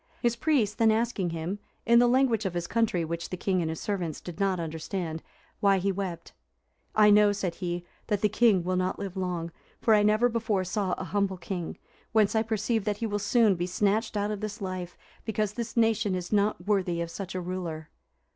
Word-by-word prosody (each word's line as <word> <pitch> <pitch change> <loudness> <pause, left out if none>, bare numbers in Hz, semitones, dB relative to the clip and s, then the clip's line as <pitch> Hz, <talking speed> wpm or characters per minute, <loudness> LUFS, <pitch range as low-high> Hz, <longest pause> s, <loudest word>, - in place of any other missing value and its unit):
His 240 -2 +1
priest 235 -6 +1
then 225 -1 +5
asking 220 -4 +1
him, 165 +5 -4 0.3
in 235 0 +6
the 245 - +5
language 245 -3 +3
of 180 - -5
his 175 -1 -1
country, 195 -4 +1
which 170 +1 -4
the 185 - -4
king 185 0 0
and 160 - -1
his 160 - -4
servants 180 -6 -3
did 175 +1 -9
not 195 -2 +1
understand, 160 0 -4 0.4
why 200 -2 +4
he 195 +2 +1
wept, 190 -3 -5 0.6
"I 210 -1 +6
know," 210 0 +6
said 195 -4 -2
he, 175 -1 -3 0.2
"that 210 -3 0
the 210 - +4
king 210 -3 +3
will 185 +1 -1
not 185 0 0
live 200 -2 -5
long; 180 -3 -3 0.3
for 225 - +3
I 210 - +5
never 215 +3 +4
before 225 -5 0
saw 185 0 -1
a - - -3
humble 195 +1 -1
king; 175 -1 -5 0.4
whence 215 -2 +4
I 220 - +4
perceive 220 0 0
that 210 -1 0
he 230 - -2
will 205 -1 -1
soon 215 +1 +4
be 175 0 -2
snatched 210 +4 0
out 205 +1 0
of 210 - -3
this 215 0 -4
life, 185 -3 -5 0.3
because 215 -2 -1
this 235 0 -5
nation 220 -4 +2
is 180 +2 -4
not 205 -3 +1
worthy 190 -4 +1
of 170 0 -3
such 190 0 -6
a - - -1
ruler." 175 -3 -5
200 Hz, 210 wpm, -28 LUFS, 180-215 Hz, 0.6 s, in